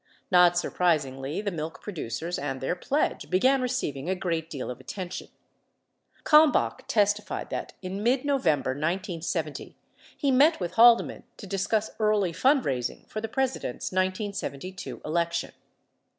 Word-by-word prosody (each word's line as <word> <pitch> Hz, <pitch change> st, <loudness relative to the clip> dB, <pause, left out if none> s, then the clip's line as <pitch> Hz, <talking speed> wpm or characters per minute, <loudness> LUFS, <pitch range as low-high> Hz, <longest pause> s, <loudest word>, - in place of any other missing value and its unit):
Not 180 Hz, -1 st, +6 dB
surpris 175 Hz, -3 st, +2 dB
higly, 135 Hz, +5 st, -5 dB
the 200 Hz, -, 0 dB
milk 160 Hz, -1 st, -5 dB
producers 165 Hz, -, -4 dB
and 135 Hz, -2 st, -3 dB
their 135 Hz, +7 st, -1 dB
pledge 280 Hz, +10 st, -1 dB
began 260 Hz, +9 st, +3 dB
receiving 185 Hz, -, -2 dB
a 190 Hz, -, +1 dB
great 165 Hz, -3 st, -2 dB
deal 135 Hz, -5 st, -5 dB
of 125 Hz, -, -8 dB
attention. 185 Hz, -2 st, -6 dB, 1.0 s
Kalmbach 305 Hz, 0 st, +4 dB
testified 205 Hz, -1 st, 0 dB
that -, -, -4 dB
in 190 Hz, +2 st, -4 dB
mid 250 Hz, +5 st, +2 dB
November, 160 Hz, -, +1 dB
1970, 165 Hz, 0 st, -3 dB, 0.4 s
he 280 Hz, -, +1 dB
met 290 Hz, +6 st, +5 dB
with 175 Hz, -2 st, -3 dB
Halde 235 Hz, 0 st, +7 dB
man -, -, -9 dB
to 210 Hz, -, -9 dB
discuss 200 Hz, +3 st, -1 dB
early 210 Hz, -4 st, +2 dB
fundraising 165 Hz, -, +1 dB
for 215 Hz, -, -4 dB
the 225 Hz, -, -4 dB
President's 265 Hz, -, -2 dB
1972 185 Hz, -2 st, -3 dB
election. 170 Hz, +1 st, -1 dB
185 Hz, 135 wpm, -27 LUFS, 160-220 Hz, 1.0 s, Halde